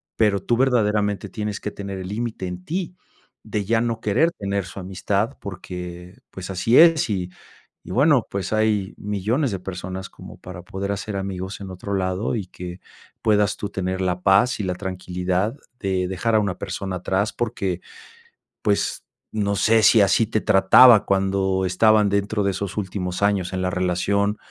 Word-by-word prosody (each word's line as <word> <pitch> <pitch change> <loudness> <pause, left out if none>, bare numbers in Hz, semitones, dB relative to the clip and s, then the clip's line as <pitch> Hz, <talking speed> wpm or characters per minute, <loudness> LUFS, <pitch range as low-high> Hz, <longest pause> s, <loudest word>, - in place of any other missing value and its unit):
pero 105 -3 +2
tú 120 - 0
verdaderamente 105 -5 +1
tienes 105 -2 -4
que - - -4
tener 100 -2 -6
el 90 - -6
límite 105 -2 -4
en 90 0 -7
ti, 180 +1 -3 0.5
de 105 - -2
ya 115 +3 +2
no 115 -1 -2
querer 135 +12 +2
tener 100 - -3
su 95 +2 -9
amistad, 100 +6 -2
porque, 90 -1 -8
pues 95 0 -8
así 105 +6 +2
es 165 -7 +6
y 90 -2 -2 0.5
y - - -9
bueno, 140 -1 +4
pues 100 +1 -3
hay 110 -3 +1
millones 105 +7 -1
de 95 - -3
personas 95 +1 -6
como - - -12
para 90 -1 -9
poder 100 +2 -4
hacer 100 +1 -4
amigos 95 0 -4
en 95 - -7
otro 95 +2 -6
lado 95 +4 -1
y 105 - -3
que 90 0 -8 0.4
puedas 105 -1 +3
tú 105 - -4
tener 95 -1 -3
la 90 -1 -1
paz 100 +6 +3
y - - -1
la 90 -1 -2
tranquilidad 90 +3 -2 0.2
de 95 -2 -1
dejar 105 +5 0
a - - +6
una 100 -4 -1
persona 95 -1 -4
atrás, 95 +3 -1
porque, 95 -6 -2 0.8
pues 100 -2 0 0.3
no 100 -2 0
sé 110 +3 +4
si 110 0 +6
así 105 +3 +3
te 110 0 -1
trataba 105 +4 +7
cuando 95 -1 +1
estaban 105 +3 +4
dentro 100 +1 0
de 100 - +2
esos 95 0 -4
últimos 95 -2 -3
años 100 -3 +1
en 95 0 -2
la 90 - 0
relación 95 +3 0
100 Hz, 175 wpm, -23 LUFS, 95-105 Hz, 0.8 s, trataba